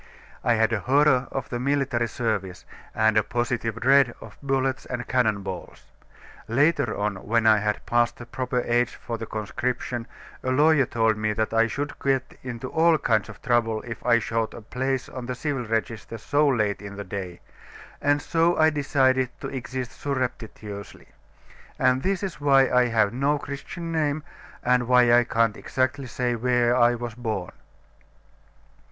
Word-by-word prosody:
I 120 - +3
had 110 +1 +2
a 110 - +1
horror 135 0 +3
of 135 - -4
military 130 -1 0
service, 105 -7 -3 0.3
and 110 -1 +3
a 105 - +4
positive 115 -1 -2
dread 130 0 +4
of 105 -2 -12
bullets 135 -1 -1
and 125 -1 -4
cannon 110 -6 +1
balls. 95 -2 -7 0.6
Later 145 0 +2
on, 105 -1 -1
when 115 +4 0
I 110 -1 +6
had 105 0 -2
passed 120 0 +1
the 120 - -9
proper 125 +1 -2
age 120 0 0
for 115 -1 -6
the 115 - -5
conscription, 120 +2 -3 0.4
a 130 - -1
lawyer 145 0 +4
told 115 -2 +1
me 105 0 0
that 110 +1 -1
I 115 0 +4
should 140 +5 -3
get 135 -1 -1
into 125 0 -6
all 165 0 +4
kinds 110 -6 +1
of 110 - -12
trouble 115 -3 +1
if 115 -2 -8
I 120 -1 +4
sought 115 -1 -2
a - - -9
place 130 +3 -2
on 125 -3 -7
the 125 - -3
civil 135 -1 -3
register 115 0 -3
so 145 +7 +1
late 105 -7 +1
in 100 0 -8
the 100 - -5
day; 90 -2 -6 0.6
and 145 0 +2
so 165 +1 +2
I 155 0 +5
decided 130 -3 +2
to - - -4
exist 130 -1 -5
surreptitiously. 115 -7 -5 0.7
And 130 0 +2
this 195 +4 -1
is 185 -6 -5
why 135 -2 +4
I 125 0 +4
have 110 -2 +2
no 140 +4 +1
Christian 145 +4 -6
name, 155 -2 0 0.4
and 125 -1 +2
why 125 -1 +5
I 120 0 +5
can't 115 -2 +1
exactly 130 +3 -2
say 120 0 -1
where 120 0 +2
I 120 -1 +4
was 120 -1 -5
born." 110 -6 -4
120 Hz, 170 wpm, -25 LUFS, 115-135 Hz, 0.7 s, I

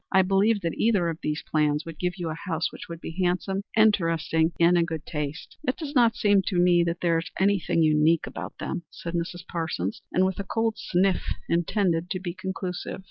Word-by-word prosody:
"I 190 - +5
believe 200 +3 +2
that 165 -3 -1
either 200 -7 +2
of 165 -1 -5
these 150 +1 -2
plans 150 -1 +1
would 165 -2 -9
give 180 +1 -1
you 170 -3 -3
a - - -2
house 165 +1 -2
which - - -10
would 170 -1 -6
be 165 +3 -7
handsome, 185 +2 0 0.2
interesting 165 -6 +3
and 170 +1 +5
in 170 - +4
good 160 -2 -5
taste." 150 0 -5
"It 255 - +1
does 295 -3 -5
not 235 -4 +4
seem 205 -2 +4
to 185 - 0
me 175 -1 +5
that 170 +1 -2
there 170 -2 +2
is 165 - -6
anything 190 -4 +2
unique 155 +1 +3
about - - -7
any - - -4
of - - -1
them," - - -19
said 170 - -7
Mrs. 175 +1 -3
Parsons, 160 - -3
with 190 +1 +1
a - - -1
cold 225 +2 -1
sniff 185 0 +1 0.2
intended 175 0 +1
to 185 - -2
be 180 -2 -4
conclusive. 185 -1 -5
175 Hz, 215 wpm, -26 LUFS, 165-195 Hz, 0.2 s, I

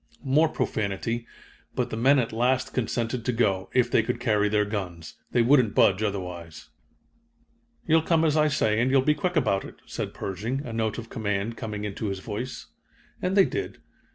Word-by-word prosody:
More 150 +4 +4
profanity, 115 0 -2 0.5
but - - -1
the - - -2
men 135 +5 +4
at 115 -4 0
last 125 +3 +1
consented 120 0 -1
to 125 - 0
go, 100 -6 0
if 125 -1 +2
they - - +5
could 115 - -3
carry 105 -4 +2
their 105 0 +2
guns. 90 -6 -5 0.2
They 120 - +3
wouldn't 125 -4 +4
budge 100 +1 +4
otherwise. 90 -6 -5 1.2
"You'll 160 0 +4
come 165 0 +2
as 155 -1 +2
I 155 -1 +4
say, 110 -7 +1
and 125 - +2
you'll 135 -1 +4
be 150 +2 +4
quick 180 +4 -2
about 110 -10 +2
it," - - -10
said - - -5
Pershing, 110 +9 -3
a 115 - -6
note 110 -1 -1
of 115 -1 -8
command 105 -1 -2
coming 105 -2 -5
into 105 +1 -3
his 95 -1 -2
voice. 105 -3 -6 0.6
And 185 +2 0
they 195 - +7
did. 395 - -4
115 Hz, 185 wpm, -26 LUFS, 105-130 Hz, 1.2 s, they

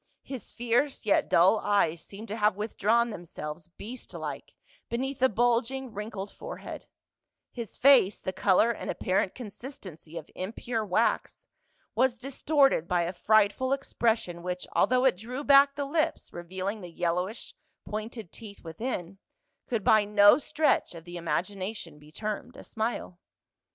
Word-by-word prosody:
His 265 -4 -7
fierce 245 +4 0
yet 205 - +3
dull 190 +6 +5
eyes 170 -6 +1
seemed 210 +3 -10
to 210 - -3
have 210 -2 +2
withdrawn 225 +2 +1
themselves 160 -3 -7
beast 220 +8 -10
like - - -6 0.3
beneath 265 +3 -2
the 260 +1 +5
bulging 240 +3 0
wrinkled 210 -1 -5
forehead; - - -8 0.6
his 235 -4 -7
face, 255 -8 +6
the 185 - -4
color 195 +4 +4
and 235 - -6
apparent 185 0 0
consistency 200 - -9
of 160 - -7
impure 225 +4 -3
wax, 215 +3 0 0.5
was 255 -1 +2
distorted 275 - +2
by 175 -1 +2
a 170 +2 -3
frightful 215 +7 +3
expression 225 -9 -1
which, 180 0 -4
although 255 +1 +3
it 255 -8 +4
drew 250 +8 -6
back 280 0 +6
the 285 -1 -2
lips 310 +2 -1
revealing 185 +4 -4
the 180 - -8
yellowish 180 +6 -2 0.3
pointed 215 -2 -6
teeth 210 -3 -11
within, 180 +1 -5 0.5
could 230 -5 -1
by 215 +1 +5
no 205 +3 +6
stretch 305 - +1
of 165 - -9
the 175 +1 -10
imagination 175 +1 -3
be 150 +1 -17
termed 215 +7 -5
a - - -10
smile. 220 -5 -3
215 Hz, 145 wpm, -28 LUFS, 180-245 Hz, 0.6 s, face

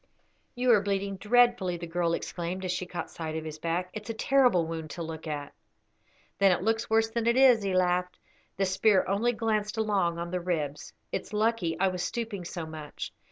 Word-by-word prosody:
"You 245 0 +3
are 215 -4 +6
bleeding 200 0 -2
dreadfully," 230 -4 +3
the 170 - -6
girl 170 0 0
exclaimed, 180 +3 -4
as 180 - -1
she 180 0 -3
caught 175 -2 -5
sight 160 -1 -5
of 160 0 -4
his 155 0 -7
back. 175 +3 -2
"It's 215 -1 -7
a 230 - -3
terrible 250 -8 +3
wound 160 -1 -5
to 170 - -5
look 160 0 -7
at." 145 -2 -4 0.9
"Then 195 -1 +6
it 180 - 0
looks 225 +2 0
worse 225 0 +3
than 230 0 -1
it 235 +1 +3
is," 255 -4 +6
he 195 -2 -1
laughed. 180 0 +1 0.4
"The 195 - +2
spear 190 +1 +3
only 205 +6 +2
glanced 220 -2 -1
along 200 -6 +1
on 170 0 -4
the 180 -1 -1
ribs. 155 -5 -3 0.2
It's - - -4
lucky 210 -6 +1
I 190 0 +3
was 180 -1 -4
stooping 215 -3 -3
so 170 -1 -5
much. 155 -2 -7
185 Hz, 205 wpm, -28 LUFS, 170-220 Hz, 0.9 s, are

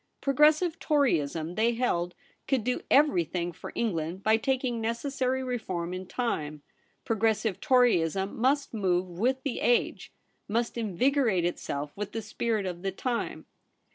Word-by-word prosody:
Progressive 305 +5 +3
Toryism, 170 - +1
they 225 +4 +2
held, 180 -8 -1 0.3
could 265 -5 +1
do 250 +2 -1
everything 175 - +3
for 170 - -9
England 180 -4 -2
by 220 0 +5
taking 250 0 -1
necessary 260 +3 -1
reform 190 -9 -3
in 185 0 -6
time. 155 - -3 0.4
Pro 225 - 0
gressive 220 -2 +1
Toryism 195 -7 +2
must 275 +4 +1
move 185 -4 +1
with 245 +10 -1
the 275 - -2
age; 240 - +1 0.4
must 230 +3 -1
invigorate 230 -2 +1
itself 145 -4 -3
with 210 +1 -5
the 225 0 -3
spirit 220 -1 -1
of 175 -2 -4
the 195 0 -1
time. 235 +5 -3
225 Hz, 140 wpm, -28 LUFS, 180-255 Hz, 0.4 s, by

